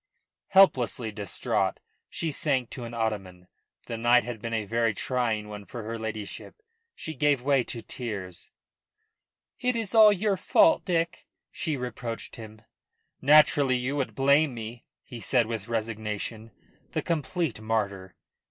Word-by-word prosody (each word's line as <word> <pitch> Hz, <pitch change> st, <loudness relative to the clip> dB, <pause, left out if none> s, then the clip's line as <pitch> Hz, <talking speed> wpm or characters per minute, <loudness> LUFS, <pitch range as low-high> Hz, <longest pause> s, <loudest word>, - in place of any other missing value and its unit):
Helplessly 125 Hz, -, +4 dB
distraught, 100 Hz, -3 st, -1 dB, 0.3 s
she 165 Hz, -, -2 dB
sank 135 Hz, -5 st, 0 dB
to 125 Hz, -, -6 dB
an 115 Hz, -, -8 dB
ottoman. 95 Hz, -6 st, -3 dB, 0.4 s
The 115 Hz, -, -5 dB
night 120 Hz, +1 st, +5 dB
had 120 Hz, -3 st, -6 dB
been 115 Hz, -, -4 dB
a 110 Hz, -2 st, -1 dB
very 115 Hz, 0 st, +1 dB
trying 115 Hz, -3 st, -1 dB
one 105 Hz, -1 st, -8 dB
for 115 Hz, +2 st, -8 dB
her 115 Hz, +1 st, -5 dB
ladyship. 110 Hz, -2 st, -6 dB, 0.4 s
She 160 Hz, -, -6 dB
gave 145 Hz, -3 st, +2 dB
way 135 Hz, -2 st, +3 dB
to 115 Hz, -, -6 dB
tears. 100 Hz, -8 st, -6 dB, 1.1 s
"It 250 Hz, 0 st, +1 dB
is 225 Hz, -3 st, -1 dB
all 215 Hz, -2 st, +8 dB
your 200 Hz, 0 st, +1 dB
fault, 320 Hz, -, +4 dB
Dick," 170 Hz, -2 st, -1 dB, 0.2 s
she 155 Hz, -4 st, -2 dB
reproached 120 Hz, -2 st, -5 dB
him. 110 Hz, -1 st, -11 dB, 0.6 s
"Naturally 145 Hz, -2 st, +5 dB
you 130 Hz, +3 st, -2 dB
would 140 Hz, -3 st, -2 dB
blame 140 Hz, 0 st, +3 dB
me," 115 Hz, +1 st, -7 dB, 0.2 s
he 120 Hz, -, -9 dB
said 120 Hz, +1 st, +2 dB
with 110 Hz, -2 st, -5 dB
resignation 110 Hz, -1 st, -4 dB, 0.4 s
the -, -, -1 dB
complete 165 Hz, -, -2 dB
martyr. 100 Hz, -4 st, -2 dB
120 Hz, 145 wpm, -27 LUFS, 110-145 Hz, 1.1 s, all